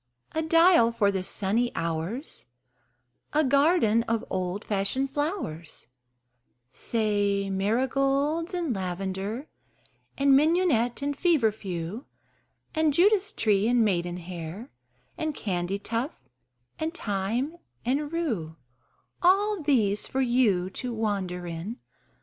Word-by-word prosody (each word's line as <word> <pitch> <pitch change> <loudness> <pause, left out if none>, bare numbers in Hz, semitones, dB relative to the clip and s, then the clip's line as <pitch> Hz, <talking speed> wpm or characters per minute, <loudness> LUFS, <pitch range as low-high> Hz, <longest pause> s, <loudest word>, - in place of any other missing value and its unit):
A 320 - -1
dial 330 -6 +5
for 205 -3 +2
the 190 -1 -1
sunny 215 +6 0
hours, 165 - -4 0.9
A 305 +1 +3
garden 280 -4 +4
of 230 -1 0
old 185 +2 -2
fashioned 215 +7 -1
flowers 275 - -4 0.8
Say 205 - 0
marigolds 275 - 0
and 335 -9 -1
lavender 195 - -4 0.7
And 275 -1 +5
mignonette 290 -5 +2
and 285 0 -1
fever 300 -12 +3
few, 195 - -6 0.7
And 315 -2 +2
Judas 405 +3 +4
tree 210 - +2
and 240 -1 +3
maidenhair 175 +1 -3 0.5
And 310 -2 -2
candytuft 200 - -2 0.6
and 320 +2 -2
thyme 225 - -2 0.3
and 285 +4 0
rue 225 - -2 0.7
All 395 +2 +3
these 220 -9 +2
for 265 - -1
you 230 -8 +2
to 250 +5 -4
wander 200 -6 -2
in. 170 +7 -5
230 Hz, 105 wpm, -27 LUFS, 195-290 Hz, 0.9 s, dial